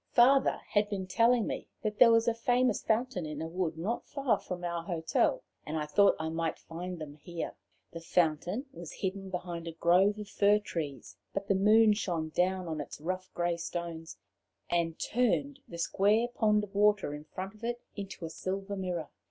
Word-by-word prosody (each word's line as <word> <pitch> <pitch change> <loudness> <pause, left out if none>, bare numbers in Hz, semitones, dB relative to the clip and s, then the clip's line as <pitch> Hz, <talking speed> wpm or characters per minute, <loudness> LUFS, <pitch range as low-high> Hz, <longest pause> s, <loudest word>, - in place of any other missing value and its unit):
Father 265 +2 +5
had 205 0 +2
been 195 -2 -3
telling 230 +4 +3
me - - -4 0.2
that 210 -1 -2
there 240 -2 +9
was 230 0 +4
a 235 - +4
famous 245 0 +2
fountain 225 -3 0
in 150 -1 -5
a 160 - -3
wood 165 -1 -2
not 205 +9 -2
far 275 -3 +1
from 180 -1 -6
our 170 -1 -2
hotel, 170 - 0 0.2
and 155 +1 -4
I 150 - -1
thought 200 +7 +4
I 160 - -2
might 165 0 -2
find 175 +2 -6
them 155 -3 -7
here. 170 +2 -5 0.4
The 165 - -7
fountain 175 - +1
was 170 -7 -8
hidden 195 0 -4
behind 175 -2 -5
a 165 - -5
grove 185 +5 +4
of 210 -1 -6
fir 205 +1 +4
trees, 145 - -5 0.2
but 200 - -2
the - - +3
moon 215 +3 +6
shone 170 -6 -2
down 185 +2 0
on 155 -2 -3
its 145 - -8
rough 185 +4 -4
grey 175 -1 0
stones, 170 -1 -5 0.5
and 170 -2 +1
turned 255 +4 0
the 170 - -8
square 205 +7 +2
pond 210 -3 +2
of 205 -1 -8
water 205 -6 +3
in 150 +1 -8
front 190 +5 -6
of 215 +1 -19
it 240 +1 -2 0.2
into 195 -4 -6
a - - -5
silver 195 +3 -4
mirror. 180 -5 -3
185 Hz, 195 wpm, -31 LUFS, 165-210 Hz, 0.5 s, there